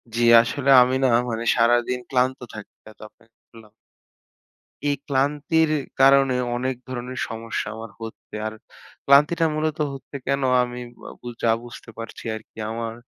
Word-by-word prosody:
জ্বি, 120 - +1 0.2
আসলে 135 +4 -2
আমি 130 +1 +2
না - - +5 0.2
মানে 115 0 -3
সারাদিন 120 +1 +2
ক্লান্ত 130 0 +1
থাকি 105 -1 -10 0.2
এত - - -23
অপেক্ষা 115 0 -30
করলাম। 110 -2 -16 1.2
এই 145 - +1
ক্লান্তির 150 +3 +1 0.3
কারণে 135 -1 +5 0.2
অনেক 130 +1 -2
ধরনের 125 0 -6
সমস্যা 115 -1 -4
আমার 110 -1 -9
হচ্ছে। 115 0 -10
আর 110 - -6 0.5
ক্লান্তিটা 150 +4 +4
মূলত 155 0 -1 0.2
হচ্ছে 135 +1 -11
কেন? 140 0 0 0.2
আমি 125 0 -6 0.3
আ - - -9
বু - - -10 0.2
যা 115 - +4
বুঝতে 120 -1 -12
পারছি 115 0 -8
আরকি। 110 0 -13
আমার 115 0 -4
125 Hz, 145 wpm, -23 LUFS, 115-140 Hz, 1.2 s, না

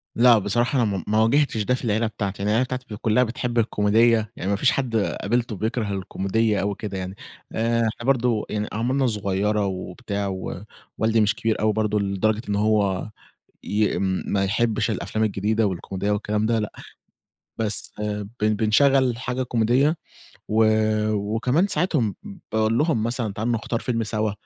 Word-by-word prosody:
لأ، 120 0 +6
بصراحة 120 +6 +1
أنا - - +2
م 90 - -5
ما 110 +1 +2
واجهتش 115 -2 +2
ده 125 - +1
في - - -7
العيلة 110 +1 +1
بتاعتي، 100 -2 -4
أنا 105 - 0
العيلة 115 +4 +3
بتاعتي 130 0 -5
ك - - -11
كلّها 110 +3 +3
بتحب 120 0 -3
الكوميدية، 110 0 +3
يعني 95 - -4
ما 100 - +2
فيش 125 +6 +3
حد 130 -4 -2
قابلته 115 +2 0
بيكره 110 +1 -2
الكوميدية 100 +3 0
أوي 100 0 -1
كده 100 -3 -4
يعني. 95 0 -5 0.4
آآ، 115 +1 +1
إحنا 115 +1 -2
برضه 125 -4 +2
يعني 105 0 -2
أعمارنا 130 +4 +1
صغيرة 105 -1 0
وبتاع 100 +2 -4
و 95 -1 -5 0.3
والدي 110 0 +2
مش 105 -1 +2
كبير 110 -1 -1
أوي 110 0 +2
برضه 105 0 0
لدرجة 100 +2 0
إن 100 - +1
هو 105 -2 +1 0.5
ي 105 0 0
ما 95 +1 0
يحبش 110 +3 +1
الأفلام 110 +2 -1
الجديدة 105 +2 +1
والكوميدية 95 +2 -3
والكلام 105 +1 0
ده 115 0 +2
لأ. 105 - -3 0.9
بس 110 -2 -1
بن 105 -1 -3 0.2
بن 105 0 +2
بنشغل 125 +3 +3
حاجة 125 +1 -2
كوميدية، 125 +6 +2 0.5
و 110 +1 +3 0.5
وكمان 115 - +1
ساعات 185 -2 +1 0.6
باقول 110 +1 +2
لهّم 150 -7 +1
مثلًا 115 -2 -2
تعالوا 110 +4 -1
نختار 115 +1 -2
فيلم 115 -2 -1
سوا، 110 -1 -1
110 Hz, 165 wpm, -23 LUFS, 105-120 Hz, 0.9 s, لأ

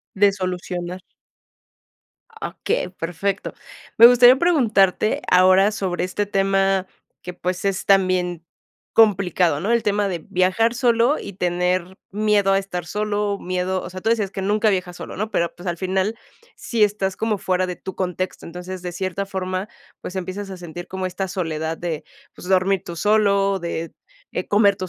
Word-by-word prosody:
De 200 0 +4
solucionar. 180 -1 -4 1.3
Ah, - - -6
okey, - - 0
perfecto. 180 +3 -3 0.4
Me 230 - +10
gustaría 245 +1 +7
preguntarte 220 - +2
ahora 185 +2 +6
sobre 185 -4 -2
este 205 +3 -2
tema 195 -1 +1 0.4
que, 180 - -6
pues, 180 +1 -3
es 195 -1 -1
también 185 -3 +2 0.5
complicado, 185 -8 +3
¿no?, 205 +6 -2
el 235 -1 +3
tema 205 -1 +1
de 175 - -3
viajar 190 +6 +2
solo 240 +2 +2
y 200 - -8
tener 180 0 -1
miedo 205 -1 +2
a 195 - +4
estar 180 -3 -4
solo, 205 +2 -1
miedo, 185 0 -2
o - - -7
sea, 185 +1 -7
tú 225 +4 0
decías 210 -4 0
que 195 - -4
nunca 210 +2 +2
viajas 180 -2 -2
solo, - - -8
¿no?, 215 +2 -3
pero, 170 -4 -1
pues, 175 +1 -7
al 170 - -2
final, 190 +4 -1 0.4
sí 230 -3 -1
estás 200 -2 +1
como 220 -2 -1
fuera 185 -1 0
de 180 -1 -5
tu 190 - -8
contexto. 185 0 -3
Entonces, 180 +2 -7
de 180 - -5
cierta 190 +2 -3
forma, 190 0 -4 0.3
pues, 180 - -7
empiezas 190 +2 -5
a 190 - -6
sentir 175 0 -9
como 190 0 -3
esta 190 +1 -4
soledad 160 -3 -3
de, 160 -3 -4 0.3
pues, 180 - -10
dormir 190 0 +2
tú 170 - -7
solo, 200 0 +2
de, 165 -1 -4 0.4
eh, - - -4
comer 205 -1 +4
tú 185 -2 -5
190 Hz, 170 wpm, -22 LUFS, 180-205 Hz, 1.3 s, Me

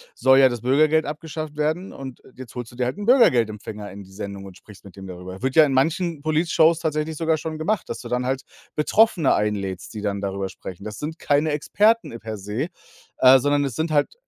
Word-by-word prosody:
soll 130 0 +5
ja 135 - +7
das 120 -3 -4
Bürgergeld 155 +5 +3
abgeschafft 155 0 -6
werden 155 +5 -1
und 135 -2 -9
jetzt 130 -3 -11
holst 120 -2 -6
du - - -15
dir 125 - 0
halt 125 - -3
'n 205 - -5
Bürgergeldempfänger 110 - +2
in 100 +1 -10
die 95 - -17
Sendung 100 0 -7
und 95 -2 -11
sprichst 100 0 -16
mit 100 - -13
dem 95 - -10
darüber. 90 +1 -9
Wird 130 +1 -1
ja 160 -1 +8
in 140 - -1
manchen 160 +4 0
Politshows 160 +1 +3
tatsächlich 155 -1 -2
sogar 160 0 +1
schon 155 +1 -5
gemacht, 175 +4 -2
dass - - -4
du 120 - -8
dann 125 +1 -1
halt 130 +1 -2 0.3
Betroffene 170 -1 +3
einlädst, 100 -4 -3
die 105 - -6
dann 100 -1 -2
darüber 100 -1 -3
sprechen. 95 +1 -10
Das 105 -1 -6
sind 160 +2 -5
keine 145 +2 +1
Experten 205 - +1
per 110 -1 -6
se, 105 - -3 0.5
äh, 130 +1 +7
sondern 145 +2 +1
es 130 -5 -4
sind 160 0 -2
halt 145 -1 +1
135 Hz, 220 wpm, -23 LUFS, 105-155 Hz, 0.5 s, ja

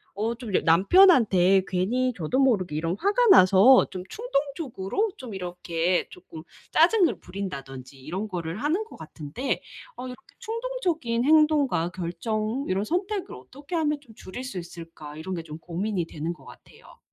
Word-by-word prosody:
어 220 +3 -1
좀 230 -5 -8
여 - - +5
남편한테 195 - +5
괜히 235 +8 0
저도 170 +9 -1
모르게 200 - +2
이런 165 +4 -2
화가 415 +5 +2
나서 205 - +7
좀 185 -2 -6
충동적으로 290 - -2
좀 255 - -9
이렇게 175 -1 -1
쪼끔 165 -3 -12 0.3
짜증을 335 - +3
부린다든지 135 -9 -7
이런 185 +9 -4
거를 175 +1 -5
하는 320 +9 0
것 435 - -14
같은데 160 - -4 0.3
어 250 - -7
'이렇게 250 +7 -12
충동적인 440 - -2
행동과 295 - +3
결정 215 +8 -3
이런 190 +2 0
선택을 375 - -2
어떻게 270 - -12
하면 300 -2 0
좀 235 -6 -17
줄일 215 +7 -8
수 250 -7 -6
있을까?' 165 -3 -10
이런 185 +4 -6
게 165 -2 -4
좀 155 -1 -9
고민이 180 +2 -3
되는 160 +2 -4
것 150 -5 -18
같아요. - - -16
205 Hz, 325 characters per minute, -25 LUFS, 175-290 Hz, 0.3 s, 나서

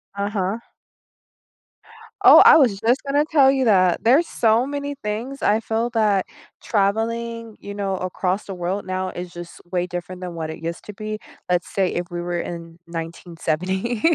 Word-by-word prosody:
Uh-huh. 200 +1 -2 1.7
Oh, - - +10
I - - +10
was 235 -10 +3
just 235 +4 +2
gonna 285 +2 +2
tell 275 -4 +5
you 265 -1 +1
that. 185 -5 +3
There's 275 +9 +4
so 225 +2 +2
many 285 0 -4
things 230 +6 -4
I 210 +2 +3
feel 225 +1 -1
that 210 -5 +2 0.4
traveling, 230 +2 -1
you 200 - -8
know, 195 -2 -2
across 185 +2 -2
the 195 - -6
world 180 +3 -3
now 185 0 -2
is 180 -1 -7
just 175 -1 -9
way 180 -1 0
different 180 +1 -6
than 180 -1 -5
what 160 -1 -4
it 160 - -8
used 170 +1 -5
to 210 - -8
be. 215 +1 -5 0.3
Let's 180 -1 +1
say 190 -2 +1
if 175 - -2
we 175 0 -3
were 175 0 -2
in 170 -1 -7
1970. 170 +5 -3
200 Hz, 170 wpm, -22 LUFS, 180-230 Hz, 1.7 s, Oh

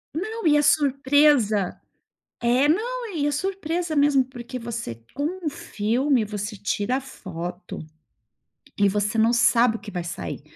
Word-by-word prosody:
Não. 435 +3 -2
E 295 -1 +5
a 295 - +3
surpresa 275 - +3 0.6
é 245 +4 +3
não, 460 +4 -1
e 290 -2 0
a 295 - +1
surpresa 345 0 -2
mesmo 285 -2 +4
porque 255 0 -8
você, 230 - -6
com 285 - -3 0.2
um 305 - +2
filme, 240 +1 0
você 205 0 -5
tira 210 +5 -1
a - - -4
foto. 180 -8 -7 1.0
E 200 - +5
você 205 +3 -1
não 225 +2 +4
sabe 235 -1 +4
o - - -16
que 205 0 -10
vai 175 -2 -3
sair. 175 -4 -5
250 Hz, 155 wpm, -24 LUFS, 210-295 Hz, 1.0 s, E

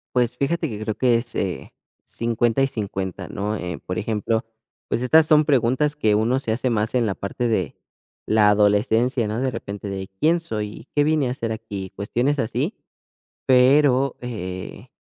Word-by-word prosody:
Pues, 125 -1 +1
fíjate 165 +3 0
que 105 -3 -6
creo 110 -1 -1
que 125 -2 +3
es, 115 +1 -4
eh, 90 -9 -3 0.3
50 115 +1 0
y 135 - +4
50, 95 -6 -4
¿no?, 105 +2 -3
eh, 90 -6 -5
por 90 - -4
ejemplo, 110 +1 -1 0.4
pues, - - -1
estas 155 +5 +5
son 155 -1 +5
preguntas 140 +2 +2
que 110 -8 +2
uno 115 +5 +2
se 115 - -3
hace 125 +3 0
más 110 -1 0
en 120 -3 +2
la 100 - -2
parte 110 +5 -3
de 95 -9 -1 0.5
la 110 -1 +4
adolescencia, 105 +4 +2
¿no? 110 +2 -2
De 135 - +1
repente, 100 -4 -6
de: 95 -1 -5
"¿Quién 165 +2 +3
soy? 110 -5 -5
¿Qué 145 - +4
vine 150 -4 +1
a - - -1
hacer 115 -3 -3
aquí?", 105 -4 -6
cuestiones 120 +9 0
así, 115 -4 -1 0.7
pero, 130 +1 +4
eh, 95 -7 -6
115 Hz, 175 wpm, -22 LUFS, 105-130 Hz, 0.7 s, estas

